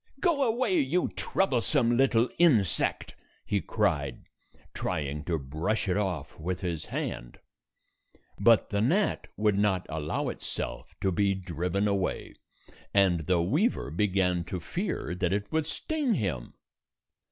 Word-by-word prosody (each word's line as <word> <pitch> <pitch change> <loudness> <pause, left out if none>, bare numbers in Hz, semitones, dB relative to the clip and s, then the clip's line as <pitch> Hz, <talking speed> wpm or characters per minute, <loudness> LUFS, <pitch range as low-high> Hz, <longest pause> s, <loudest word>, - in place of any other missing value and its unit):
"Go 335 -6 +2
away, 230 -5 +2
you 160 +7 +1
troublesome 125 -7 +1
little 125 -2 +4
insect," 115 - +2 0.3
he - - 0
cried, - - -1 0.5
trying 75 -1 -3
to 85 -2 0
brush 80 +11 -2
it 90 - +1
off 90 -9 -2
with 90 +3 -3
his 85 -4 -3
hand. - - -4 1.0
But 115 +2 +4
the 100 0 +1
gnat 185 - +1
would 105 -2 +2
not 95 -3 +1
allow 80 -1 -2
itself - - -5
to 95 - +2
be 100 +2 +2
127 90 -3 -8
driven 90 +5 0
away, 100 -2 -1 0.6
and 90 -5 +3
the 90 -2 +3
weaver 150 - +1
began 90 -1 +1
to 90 - -4
fear 170 - -3
that 90 0 0
it 100 0 -2
would 160 -1 0
sting 290 - -1
him. 80 - -3
100 Hz, 135 wpm, -28 LUFS, 85-130 Hz, 1.0 s, little